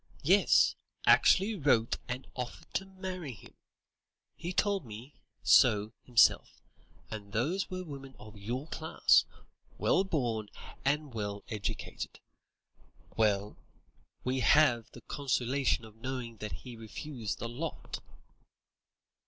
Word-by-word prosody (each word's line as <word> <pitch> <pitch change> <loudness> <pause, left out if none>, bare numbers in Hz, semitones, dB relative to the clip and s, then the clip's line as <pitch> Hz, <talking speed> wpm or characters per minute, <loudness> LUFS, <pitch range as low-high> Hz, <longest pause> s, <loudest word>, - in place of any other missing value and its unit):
Yes, - - +5 0.3
actually 200 +4 +5
wrote 135 - +2
and 125 +1 -4
offered 125 -1 -6
to 195 - -1
marry 185 -6 -6
him! 105 - -15 0.8
He 170 +2 -5
told 200 0 +1
me 115 +4 -10 0.3
so 110 -4 +5
himself, 120 -2 +3 0.5
and 100 -2 -7
those 165 - 0
were 185 -1 -4
women 135 -5 -9
of 110 0 -12
your 120 +7 -4
class, 160 +1 +3 0.5
well 190 - +3
born 120 - -1 0.3
and 145 0 0
well 100 -2 -4
educated. 105 -3 -4 1.0
Well, 105 -2 +1 0.7
we 130 +1 0
have 130 -5 +4
the - - -13
consolation 130 -3 0
of 110 -1 -14
knowing 125 -1 -5
that 105 0 -5
he 125 -2 -8
refused 115 +1 -5
the 115 - -4
lot." 140 +8 -5
125 Hz, 115 wpm, -31 LUFS, 110-150 Hz, 1.0 s, Yes